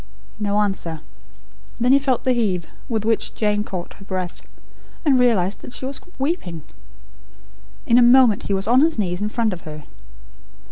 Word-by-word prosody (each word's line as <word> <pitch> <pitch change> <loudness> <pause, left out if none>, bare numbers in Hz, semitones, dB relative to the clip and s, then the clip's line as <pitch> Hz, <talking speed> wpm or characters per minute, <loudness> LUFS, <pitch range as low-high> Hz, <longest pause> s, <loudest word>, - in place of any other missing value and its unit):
No 205 -1 0
answer. 175 -6 -2 0.8
Then 245 +2 +3
he 275 - +6
felt 265 -3 0
the 255 - +2
heave, 195 -8 0 0.2
with 220 -3 -1
which 225 -1 0
Jane 210 -1 +1
caught 180 -4 -6
her - - -15
breath; 185 -2 -4 0.6
and 270 -4 +4
realised 210 -6 +2
that 245 - -10
she - - -6
was 270 +1 -3 0.2
weeping. 265 - -3 1.2
In 235 +1 +5
a - - +6
moment 240 -3 +5
he 200 - 0
was 195 +1 -1
on 250 +3 +5
his 320 -1 +2
knees 180 -3 -1
in 210 - -1
front 225 -2 0
of 175 - -8
her. 155 -1 -8
215 Hz, 175 wpm, -21 LUFS, 185-250 Hz, 1.2 s, he